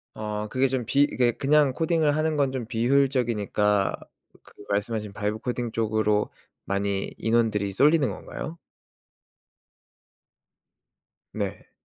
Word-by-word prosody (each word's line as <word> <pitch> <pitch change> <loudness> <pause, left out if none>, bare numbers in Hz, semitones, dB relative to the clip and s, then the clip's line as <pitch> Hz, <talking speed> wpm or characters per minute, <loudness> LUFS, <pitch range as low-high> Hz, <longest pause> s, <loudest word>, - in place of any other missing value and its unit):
아 105 0 -4
그게 130 +1 +2
좀 130 -3 -2
비 140 +5 +3
이게 125 -4 +2
그냥 145 +2 +3
코딩을 160 -2 +1
하는 155 0 +1
건 140 -2 +1
좀 130 -4 -4
비효율적이니까 115 -5 +1 0.5
그 - - -19 0.2
말씀하신 105 +1 -2
vibe 105 +1 -2
coding 120 -2 -2
쪽으로 110 -2 +1 0.4
많이 100 0 -1
인원들이 110 -3 +1
쏠리는 145 - +4
건가요? 165 +3 -7 2.7
네. - - -5
120 Hz, 275 characters per minute, -25 LUFS, 105-140 Hz, 2.7 s, 쏠리는